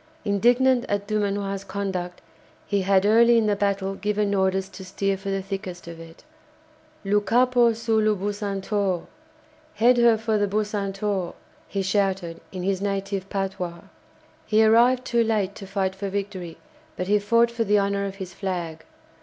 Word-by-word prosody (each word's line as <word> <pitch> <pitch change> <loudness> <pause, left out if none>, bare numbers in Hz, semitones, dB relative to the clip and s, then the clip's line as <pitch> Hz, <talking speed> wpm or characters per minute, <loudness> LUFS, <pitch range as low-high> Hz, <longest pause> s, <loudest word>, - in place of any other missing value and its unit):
Indignant 245 +5 +3
at 205 0 -1
Dumanoir's 200 -2 -1
conduct, 185 -3 -4 0.4
he 200 -1 0
had 190 0 +3
early 235 +2 +5
in 225 - +3
the 210 -1 +2
battle 200 -1 -1
given 210 0 -1
orders 190 -1 +1
to 190 - -10
steer 195 +1 -1
for 195 +1 -6
the 195 -1 -2
thickest 190 -3 -6
of 165 -1 -9
it. 165 0 -13 0.8
"Lou 205 +1 +2
capo 240 +3 +3
sur 225 0 0
lou 215 0 +2
'Bucentaure'!" 200 -2 -2 0.7
("Head 240 +4 +4
her 235 -2 +5
for 220 -1 0
the 205 - +2
'Bucentaure'!") 200 -2 -2 0.3
he 195 -1 -2
shouted 190 -3 -1
in 185 -2 -5
his 190 0 -1
native 195 -1 -3
patois. 185 -3 -3 0.7
He 220 +1 +4
arrived 245 +3 +4
too 235 -1 +2
late 210 -4 0
to 195 - -10
fight 190 -1 -1
for 195 +1 -5
victory, 195 -4 -5 0.4
but 180 - -2
he 205 +2 +3
fought 230 +3 +3
for 235 -1 -1
the 210 -1 +3
honour 200 0 0
of 195 - -7
his 190 -2 -8
flag. 170 -4 -4
200 Hz, 160 wpm, -24 LUFS, 190-215 Hz, 0.8 s, early